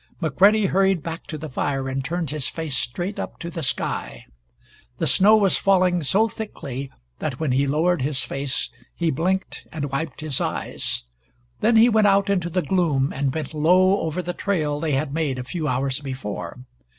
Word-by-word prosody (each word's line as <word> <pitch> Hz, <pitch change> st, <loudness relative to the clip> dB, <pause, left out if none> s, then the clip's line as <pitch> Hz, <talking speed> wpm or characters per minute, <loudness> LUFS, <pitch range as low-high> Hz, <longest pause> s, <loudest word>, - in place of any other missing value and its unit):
McCready 195 Hz, +7 st, +4 dB
hurried 190 Hz, -3 st, +2 dB
back 165 Hz, +1 st, -6 dB
to 155 Hz, -, -5 dB
the 155 Hz, +1 st, -6 dB
fire 135 Hz, -1 st, -2 dB
and 135 Hz, 0 st, -2 dB
turned 165 Hz, +1 st, -2 dB
his 150 Hz, -3 st, -1 dB
face 160 Hz, -5 st, -3 dB
straight 175 Hz, +12 st, -2 dB
up -, -, -5 dB
to 170 Hz, 0 st, -6 dB
the 165 Hz, -, -5 dB
sky. 135 Hz, -, -2 dB, 0.7 s
The -, -, 0 dB
snow 210 Hz, +3 st, +6 dB
was 200 Hz, -3 st, +2 dB
falling 185 Hz, -2 st, +3 dB
so 195 Hz, +9 st, +3 dB
thickly 140 Hz, -, -6 dB, 0.3 s
that 135 Hz, -4 st, -3 dB
when 155 Hz, -4 st, 0 dB
he 135 Hz, +2 st, +2 dB
lowered 160 Hz, +3 st, +2 dB
his 135 Hz, 0 st, 0 dB
face 135 Hz, -1 st, -1 dB, 0.2 s
he 170 Hz, -2 st, 0 dB
blinked 185 Hz, +6 st, -2 dB
and 145 Hz, -3 st, -4 dB
wiped 140 Hz, 0 st, -3 dB
his 155 Hz, -4 st, 0 dB
eyes. -, -, -3 dB, 0.6 s
Then 225 Hz, +2 st, +3 dB
he 225 Hz, +2 st, +7 dB
went 220 Hz, -3 st, +4 dB
out 200 Hz, 0 st, +3 dB
into 180 Hz, -3 st, 0 dB
the 180 Hz, +1 st, 0 dB
gloom 150 Hz, -5 st, +1 dB
and 135 Hz, 0 st, 0 dB
bent 155 Hz, +1 st, -4 dB
low 185 Hz, +5 st, +4 dB
over 165 Hz, +3 st, -2 dB
the 175 Hz, -, -3 dB
trail 155 Hz, -7 st, -1 dB
they 155 Hz, -1 st, -1 dB
had 140 Hz, +1 st, -1 dB
made 150 Hz, -5 st, -1 dB
a 125 Hz, -, -4 dB
few 155 Hz, +3 st, -3 dB
hours 130 Hz, +1 st, 0 dB
before. 130 Hz, -7 st, -5 dB
160 Hz, 185 wpm, -23 LUFS, 140-185 Hz, 0.7 s, he